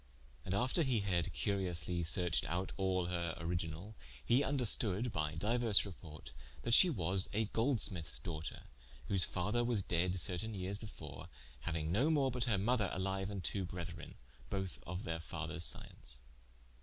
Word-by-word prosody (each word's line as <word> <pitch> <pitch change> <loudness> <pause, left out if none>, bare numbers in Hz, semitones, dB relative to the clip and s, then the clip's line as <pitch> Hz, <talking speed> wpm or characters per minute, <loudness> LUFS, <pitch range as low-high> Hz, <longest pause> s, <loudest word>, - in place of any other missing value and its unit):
And 95 - -1
after 125 - +1
he 130 -8 +2
had 90 -5 0
curiously 90 -3 0
searched 85 +1 +1
out 90 +4 -2
all 95 -2 +1
her 85 -2 -2
original, 85 +4 -3 0.3
he 120 - +4
vnderstoode 120 -5 +1
by 80 -2 -1
diuers 110 +4 +3
reporte, 80 -6 -10 0.3
that 115 - +1
she 185 - +8
was 95 - 0
a 110 +2 +2
Goldsmithes 105 - +1
doughter, 80 -5 -5 0.5
whose 95 -3 +3
father 100 +7 0
was 120 -5 +1
dead 90 +1 +1
certaine 100 +5 +5
yeares 95 +1 -3
before, 110 -2 -9 0.4
hauinge 80 -1 -1
no 120 - +3
more 140 -4 +3
but 125 0 -1
her 110 -5 +2
mother 105 0 +2
aliue, 95 +1 -2
and 100 -3 -4
two 95 +3 -1
brethren, 90 -2 -6 0.3
both 95 -2 -3
of 90 +2 -4
their 80 -2 -3
father's 85 +1 -4
science. 60 -5 -7
95 Hz, 155 wpm, -36 LUFS, 85-110 Hz, 0.5 s, she